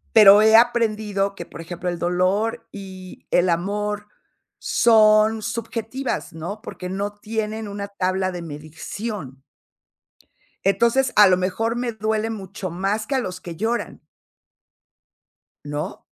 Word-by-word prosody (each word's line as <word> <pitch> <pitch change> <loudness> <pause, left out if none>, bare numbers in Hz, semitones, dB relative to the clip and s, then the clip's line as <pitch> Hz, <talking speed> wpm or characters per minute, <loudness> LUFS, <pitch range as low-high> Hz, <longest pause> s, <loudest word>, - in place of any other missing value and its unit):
Pero 210 -1 +9
he 220 0 +6
aprendido 215 -4 +2
que, 175 -3 -8
por - - -11
ejemplo, 175 +2 -5
el 175 - -3
dolor 185 +6 0
y 190 -2 -10
el 180 +1 +3
amor 205 +4 -1 0.5
son 215 -1 +4
subjetivas, 230 -1 -4
¿no?, 175 +7 -6
porque 180 -6 -7
no 200 +2 -3
tienen 220 0 -3
una 200 0 -5
tabla 185 -1 -1
de 175 -1 -6
medición. 155 - -7 1.2
Entonces 235 +6 +3
a 210 - +9
lo 185 - +5
mejor 220 +5 -1
me 240 -1 -2
duele 220 +1 -1
mucho 195 -3 -6
más 195 +5 -1
que 275 - -1
a - - +2
los 185 -6 -5
que 170 -2 -7
lloran. 230 +4 -2 1.6
¿No? 145 +1 -5
205 Hz, 130 wpm, -22 LUFS, 185-220 Hz, 1.6 s, Pero